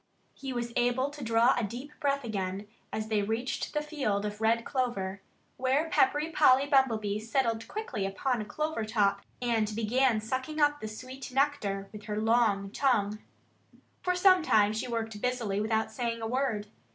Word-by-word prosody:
He 270 Hz, -1 st, -6 dB
was 240 Hz, -1 st, -3 dB
able 250 Hz, +3 st, +1 dB
to 290 Hz, -1 st, -8 dB
draw 230 Hz, +2 st, +4 dB
a 240 Hz, -, -1 dB
deep 240 Hz, +8 st, -6 dB
breath 280 Hz, -2 st, 0 dB
again 200 Hz, -2 st, -3 dB, 0.2 s
as 215 Hz, 0 st, -3 dB
they 215 Hz, -2 st, +2 dB
reached 225 Hz, +5 st, -2 dB
the 300 Hz, -, +1 dB
field 265 Hz, -10 st, -1 dB
of 210 Hz, +1 st, -5 dB
red 230 Hz, +1 st, +2 dB
clover, 200 Hz, -7 st, -2 dB, 0.4 s
where 270 Hz, +5 st, +1 dB
Peppery 295 Hz, +4 st, +2 dB
Polly 275 Hz, -3 st, +5 dB
Bumblebee 225 Hz, -8 st, +2 dB
settled 225 Hz, 0 st, -1 dB
quickly 255 Hz, -, -3 dB
upon 235 Hz, +4 st, -1 dB
a -, -, -5 dB
clover 305 Hz, +3 st, -2 dB
top 215 Hz, -2 st, +1 dB, 0.2 s
and 220 Hz, -3 st, +1 dB
began 230 Hz, +1 st, +2 dB
sucking 260 Hz, +7 st, -3 dB
up 295 Hz, 0 st, +3 dB
the 215 Hz, -, -4 dB
sweet 255 Hz, +5 st, -8 dB
nectar 250 Hz, -8 st, 0 dB
with 210 Hz, -1 st, -10 dB
her 210 Hz, -1 st, -2 dB
long 215 Hz, -3 st, +2 dB
tongue. 215 Hz, -6 st, +1 dB, 0.8 s
For 360 Hz, 0 st, 0 dB
some 370 Hz, 0 st, +6 dB
time 210 Hz, -8 st, +3 dB
she 220 Hz, -, -3 dB
worked 225 Hz, -3 st, -3 dB
busily 235 Hz, -5 st, -1 dB
without 220 Hz, +1 st, 0 dB
saying 235 Hz, -2 st, -2 dB
a -, -, -1 dB
word. 240 Hz, -4 st, -1 dB
230 Hz, 170 wpm, -29 LUFS, 215-270 Hz, 0.8 s, some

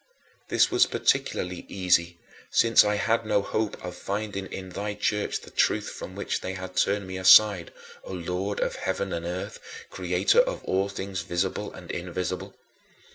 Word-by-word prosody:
This -, -, +3 dB
was -, -, +4 dB
particularly 90 Hz, 0 st, 0 dB
easy 85 Hz, -2 st, +1 dB, 0.3 s
since 115 Hz, 0 st, +5 dB
I 105 Hz, 0 st, +1 dB
had 115 Hz, +3 st, +1 dB
no 100 Hz, -2 st, +1 dB
hope 110 Hz, +1 st, -2 dB
of 90 Hz, 0 st, -6 dB
finding 100 Hz, -1 st, -4 dB
in 95 Hz, -1 st, -7 dB
thy 105 Hz, +3 st, -4 dB
Church 105 Hz, 0 st, -1 dB
the -, -, -13 dB
truth -, -, +1 dB
from -, -, -8 dB
which -, -, -2 dB
they 95 Hz, -, -4 dB
had 95 Hz, 0 st, -7 dB
turned 100 Hz, +2 st, +1 dB
me 95 Hz, 0 st, -6 dB
aside, 95 Hz, -1 st, +6 dB, 0.3 s
O -, -, -9 dB
Lord 90 Hz, +3 st, -3 dB
of -, -, -1 dB
heaven 95 Hz, -, -2 dB
and 85 Hz, 0 st, -3 dB
earth, 95 Hz, +5 st, -5 dB, 0.3 s
Creator 475 Hz, -, +2 dB
of -, -, +1 dB
all 95 Hz, +1 st, 0 dB
things 95 Hz, -2 st, -4 dB
visible 95 Hz, +3 st, -2 dB
and 85 Hz, -2 st, -9 dB
invisible. 90 Hz, +1 st, -4 dB
95 Hz, 165 wpm, -26 LUFS, 90-105 Hz, 0.3 s, aside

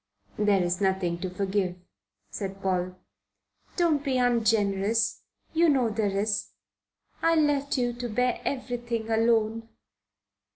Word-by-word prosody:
"There 205 Hz, -3 st, +3 dB
is 175 Hz, +2 st, -1 dB
nothing 190 Hz, -3 st, 0 dB
to 185 Hz, -, -3 dB
forgive," 190 Hz, -1 st, -1 dB, 0.6 s
said 195 Hz, -1 st, -5 dB
Paul. 185 Hz, -1 st, -1 dB, 0.8 s
"Don't 325 Hz, -5 st, +2 dB
be 270 Hz, -3 st, 0 dB
ungenerous; 225 Hz, -3 st, +2 dB, 0.3 s
you 330 Hz, +1 st, +4 dB
know 260 Hz, -5 st, +3 dB
there 205 Hz, -2 st, -1 dB
is. 205 Hz, 0 st, -1 dB, 0.7 s
I 330 Hz, 0 st, +3 dB
left 290 Hz, -3 st, +1 dB
you 245 Hz, -1 st, 0 dB
to 240 Hz, 0 st, -5 dB
bear 250 Hz, +3 st, 0 dB
everything 240 Hz, -4 st, -3 dB
alone." 225 Hz, 0 st, +1 dB
225 Hz, 120 wpm, -27 LUFS, 195-250 Hz, 0.8 s, you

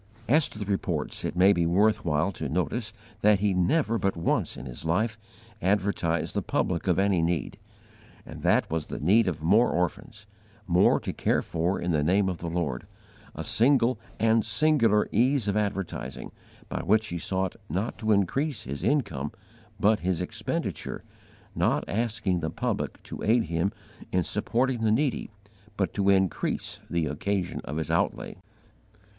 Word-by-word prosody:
As 150 Hz, +5 st, +4 dB
to -, -, -10 dB
the 105 Hz, -, -4 dB
Reports, 100 Hz, -1 st, -2 dB
it -, -, -3 dB
may 95 Hz, +3 st, +6 dB
be 85 Hz, -3 st, +1 dB
worth 105 Hz, +5 st, +3 dB
while 80 Hz, +3 st, +1 dB
to 80 Hz, -6 st, -5 dB
notice 90 Hz, -, -1 dB, 0.3 s
that 105 Hz, -1 st, +5 dB
he 100 Hz, -1 st, +1 dB
never 115 Hz, -, +1 dB
but 95 Hz, -2 st, 0 dB
once 85 Hz, -, 0 dB
in -, -, -8 dB
his 65 Hz, +3 st, -7 dB
life 110 Hz, +8 st, 0 dB, 0.5 s
advertised 90 Hz, -5 st, 0 dB
the -, -, 0 dB
public 90 Hz, +1 st, -1 dB
of 90 Hz, -2 st, +3 dB
any 95 Hz, -3 st, +2 dB
need, 85 Hz, -1 st, -1 dB, 0.7 s
and -, -, -9 dB
that -, -, +3 dB
was 80 Hz, -1 st, -2 dB
the -, -, -5 dB
need 100 Hz, +10 st, +4 dB
of 80 Hz, -4 st, -2 dB
more 105 Hz, +9 st, +4 dB
orphans 105 Hz, -, -3 dB, 0.4 s
more 90 Hz, -2 st, +4 dB
to -, -, -4 dB
care -, -, +1 dB
for 85 Hz, +3 st, -1 dB
in 90 Hz, -, -1 dB
the 75 Hz, -2 st, +2 dB
name 95 Hz, +4 st, +2 dB
of 90 Hz, -, -4 dB
the 85 Hz, -, -4 dB
Lord 80 Hz, -7 st, -2 dB, 0.5 s
a -, -, -4 dB
single 120 Hz, -1 st, +3 dB, 0.2 s
and 110 Hz, 0 st, +3 dB
singular 115 Hz, -4 st, +3 dB
ease 125 Hz, +1 st, +2 dB
of 100 Hz, -, 0 dB
advertising, 100 Hz, -3 st, -3 dB, 0.4 s
by -, -, -3 dB
which 110 Hz, +1 st, +2 dB
he 85 Hz, -, -3 dB
sought 95 Hz, +2 st, -2 dB
not 95 Hz, +8 st, -2 dB
to 110 Hz, -1 st, 0 dB
increase 115 Hz, -, +1 dB
his 70 Hz, +3 st, -6 dB
income, 100 Hz, -, 0 dB, 0.5 s
but 105 Hz, +1 st, +3 dB
his 90 Hz, -2 st, -1 dB
expenditure 90 Hz, -, -4 dB, 0.5 s
not -, -, +1 dB
asking 105 Hz, -4 st, -1 dB
the 80 Hz, -1 st, -2 dB
public -, -, -3 dB
to -, -, -8 dB
aid 115 Hz, +2 st, +3 dB
him 85 Hz, +1 st, -1 dB, 0.4 s
in 90 Hz, -1 st, +2 dB
supporting 125 Hz, +6 st, 0 dB
the 110 Hz, -, +3 dB
needy, 135 Hz, +4 st, 0 dB, 0.5 s
but 95 Hz, -, 0 dB
to 100 Hz, -1 st, +1 dB
increase 95 Hz, -2 st, 0 dB
the 85 Hz, -2 st, 0 dB
occasion 90 Hz, +4 st, -2 dB
of 75 Hz, -, -4 dB
his 80 Hz, -, -2 dB
outlay! -, -, -1 dB
95 Hz, 165 wpm, -27 LUFS, 85-110 Hz, 0.7 s, may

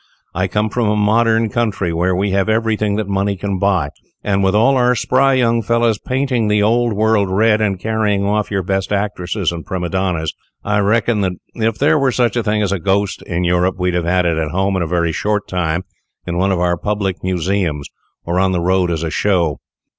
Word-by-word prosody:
I 90 Hz, -, -2 dB
have -, -, -4 dB
come 105 Hz, +3 st, 0 dB
from 115 Hz, -3 st, 0 dB
a 105 Hz, -, +1 dB
modern 110 Hz, +2 st, +2 dB
country, 105 Hz, -7 st, -1 dB
where 90 Hz, +2 st, +1 dB
we 100 Hz, +2 st, 0 dB
have 95 Hz, +2 st, +1 dB
everything 110 Hz, -2 st, 0 dB
that 105 Hz, -1 st, -2 dB
money 100 Hz, 0 st, -1 dB
can 100 Hz, 0 st, -3 dB
buy; 95 Hz, -7 st, +1 dB, 0.3 s
and 100 Hz, -1 st, 0 dB
with 95 Hz, +1 st, +2 dB
all 115 Hz, +6 st, +4 dB
our 125 Hz, -1 st, +3 dB
spry 135 Hz, +2 st, +2 dB
young 115 Hz, -2 st, +2 dB
fellows 115 Hz, -1 st, +1 dB
painting 130 Hz, -3 st, -1 dB
the 105 Hz, 0 st, +2 dB
Old 120 Hz, +2 st, +2 dB
World 105 Hz, -1 st, +2 dB
red, 105 Hz, +3 st, +2 dB
and 100 Hz, -3 st, 0 dB
carrying 105 Hz, -2 st, 0 dB
off 105 Hz, +1 st, 0 dB
your 100 Hz, -2 st, -1 dB
best 95 Hz, +2 st, -2 dB
actors 100 Hz, -2 st, -1 dB
and 85 Hz, -1 st, -6 dB
prima 90 Hz, -3 st, -4 dB
donnas, 90 Hz, -4 st, -1 dB, 0.3 s
I 105 Hz, 0 st, 0 dB
reckon 105 Hz, +1 st, +1 dB
that 95 Hz, -2 st, 0 dB, 0.2 s
if 115 Hz, -1 st, -1 dB
there 150 Hz, +2 st, +3 dB
were 135 Hz, -2 st, +2 dB
such 120 Hz, 0 st, +1 dB
a 120 Hz, -, +1 dB
thing 105 Hz, -1 st, 0 dB
as 100 Hz, -, -1 dB
a 100 Hz, -, -1 dB
ghost 100 Hz, +2 st, 0 dB
in 85 Hz, 0 st, -2 dB
Europe, 90 Hz, +1 st, +1 dB
we'd 90 Hz, -1 st, 0 dB
have 85 Hz, -1 st, -1 dB, 0.2 s
it 85 Hz, -2 st, +1 dB
at 80 Hz, -1 st, -2 dB
home 95 Hz, +4 st, 0 dB
in 95 Hz, -, 0 dB
a 85 Hz, -, -1 dB
very 85 Hz, 0 st, 0 dB
short 105 Hz, +4 st, -1 dB
time 90 Hz, -1 st, -1 dB, 0.4 s
in 85 Hz, 0 st, -2 dB
one 95 Hz, +1 st, +2 dB
of 95 Hz, -, 0 dB
our 90 Hz, 0 st, +1 dB
public 100 Hz, 0 st, -2 dB
museums, 90 Hz, -4 st, -1 dB, 0.4 s
or 85 Hz, +2 st, 0 dB
on 95 Hz, 0 st, +2 dB
the 90 Hz, -, 0 dB
road 90 Hz, +1 st, +1 dB
as 85 Hz, -1 st, -2 dB
a 80 Hz, -, -3 dB
show." 85 Hz, -7 st, +1 dB
100 Hz, 220 wpm, -17 LUFS, 90-110 Hz, 0.4 s, all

